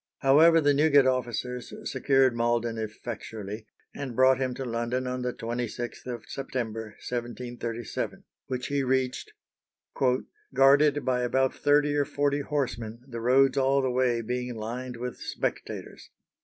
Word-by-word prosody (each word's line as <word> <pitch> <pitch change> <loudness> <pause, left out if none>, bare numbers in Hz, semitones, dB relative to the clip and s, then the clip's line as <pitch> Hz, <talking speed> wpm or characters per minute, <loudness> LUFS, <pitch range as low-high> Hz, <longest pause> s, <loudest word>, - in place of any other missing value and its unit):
However, 160 +5 +6
the 145 -2 +4
Newgate 145 -1 +5
officers 125 -1 -1
secured 135 -3 +2
Malden 120 -1 0
effectually, 110 -1 -6 0.3
and 135 -4 -6
brought 130 +1 +5
him 130 -2 -1
to 135 - -4
London 120 +2 -2
on 125 0 -3
the 125 0 -1
26th 120 +1 -5
of 120 -2 -5
September, 115 -5 -4
1737, 120 -1 -4 0.2
which 125 -1 -3
he 140 -1 0
reached 130 -1 -1 1.2
"guarded 145 +2 +5
by 125 -1 +1
about 130 +2 +1
thirty 145 0 +3
or 145 -1 +2
forty 145 0 0
horsemen, 120 -6 -3
the 115 -3 -6
roads 135 +3 +4
all 135 +1 +3
the 130 - +1
way 125 -2 +1
being 125 +1 -3
lined 120 +3 -5
with 125 +1 -5
spectators." - - -5
125 Hz, 135 wpm, -27 LUFS, 120-135 Hz, 1.2 s, However